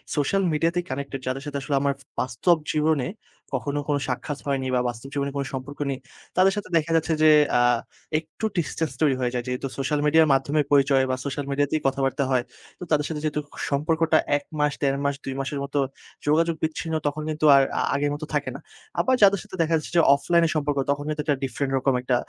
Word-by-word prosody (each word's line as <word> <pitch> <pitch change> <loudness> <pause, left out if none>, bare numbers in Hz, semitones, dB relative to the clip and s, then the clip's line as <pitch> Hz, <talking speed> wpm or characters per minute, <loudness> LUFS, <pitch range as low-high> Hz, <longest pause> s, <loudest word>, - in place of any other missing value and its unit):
Social 155 +7 +1
মিডিয়াতেই 170 +3 +1
connected. 135 0 -4
যাদের 135 +2 -2
সাথে 145 -1 -4
আসলে 140 +1 -1
আমার 140 -1 +1 0.3
বাস্তব 130 +8 +2 0.2
জীবনে 155 -4 +1 0.5
কখনো 145 +3 -2
কোনো 145 -1 +1
সাক্ষাৎ 135 +3 -3
হয়নি 135 -2 0
বা 125 - +3
বাস্তব 120 +2 -8
জীবনে 140 -1 -1
কোনো 140 - -1
সম্পর্ক 130 +3 -6
নেই। 135 -1 -3 0.4
তাদের 190 +1 +5
সাথে 205 -2 -5
দেখা 165 0 -1
যাচ্ছে 160 0 +2
যে 155 - +8 0.3
আ - - +4 0.6
একটু 160 +7 -7
distance 160 -2 -1
তৈরি 140 -4 +4
হয়ে 125 -1 0
যায়, 125 - -1
যেহেতু 125 +2 -2
সোশ্যাল 140 +2 0
মিডিয়ার 160 +1 +5
মাধ্যমেই 140 +2 +1
পরিচয় 135 -1 +4
বা 130 - +1
সোশ্যাল 140 0 -3
মিডিয়াতেই 145 +2 0
কথাবার্তা 135 +1 0
হয়। 125 -1 +2 0.4
তো - - -6
তাদের 150 -1 +3
সাথে 155 -2 -3
যেহেতু 150 -1 -1 0.3
সম্পর্কটা 160 +3 +2 0.2
১ 145 - -8 0.2
মাস, 150 -1 +2
১.৫ 135 -1 +1
মাস, 140 0 +1
২ 135 - -3
মাসের 140 +1 -3
মতো 145 +1 -2 0.5
যোগাযোগ 165 +2 +3
বিচ্ছিন্ন, 160 +1 -2
তখন 145 +1 -2
কিন্তু 155 0 -1
আর 135 - +6 0.2
আ - - +1
আগের 145 +1 0
মতো 150 +1 -6
থাকে - - 0
না। - - -7 0.4
আবার 260 - +3
যাদের 200 -1 +6
সাথে - - -10
দেখা 165 0 +1
যাচ্ছে 155 - -7
যে - - +7
অফলাইনে 170 +3 +2
সম্পর্ক, 145 -1 0
তখন 145 0 -2
কিন্তু 150 0 -1
একটা 145 -2 0
ডিফরেন্ট 135 +1 -2
রকম 135 +1 +1
একটা 125 0 +1
145 Hz, 205 wpm, -24 LUFS, 135-155 Hz, 0.6 s, যে